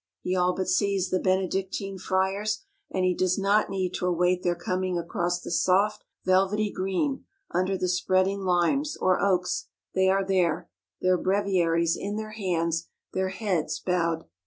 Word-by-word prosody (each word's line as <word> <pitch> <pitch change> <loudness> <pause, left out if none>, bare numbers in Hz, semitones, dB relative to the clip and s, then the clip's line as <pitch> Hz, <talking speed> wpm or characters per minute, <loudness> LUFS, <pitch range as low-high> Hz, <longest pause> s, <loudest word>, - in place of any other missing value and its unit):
He 185 - 0
all 180 0 +2
but 190 - -2
sees 195 -3 +1
the 185 - +2
Benedictine 190 +1 -1
Friars, 190 - 0 0.3
and 185 -1 0
he 185 - +3
does 185 0 +1
not 200 +2 +2
need 190 -2 -2
to 180 - -1
await 180 +1 +2
their 175 -1 +1
coming 185 +1 -2
across 175 +1 -1
the - - -7
soft, 200 +4 +2 0.2
velvety 195 +3 +2
green, 195 +9 -1 0.3
under 185 +2 0
the 185 - -1
spreading 185 +2 +1
limes, 190 - +1
or 185 -1 +2
oaks, 180 -2 +1 0.3
they 190 0 +3
are 195 0 +2
there, 180 - +1 0.3
their 185 -1 +3
breviaries 175 -4 +2
in 205 +1 -4
their 215 0 -4
hands, 170 -6 -1 0.3
their 190 0 0
heads 185 -4 -1
bowed. 170 -3 0
185 Hz, 160 wpm, -27 LUFS, 180-195 Hz, 0.3 s, he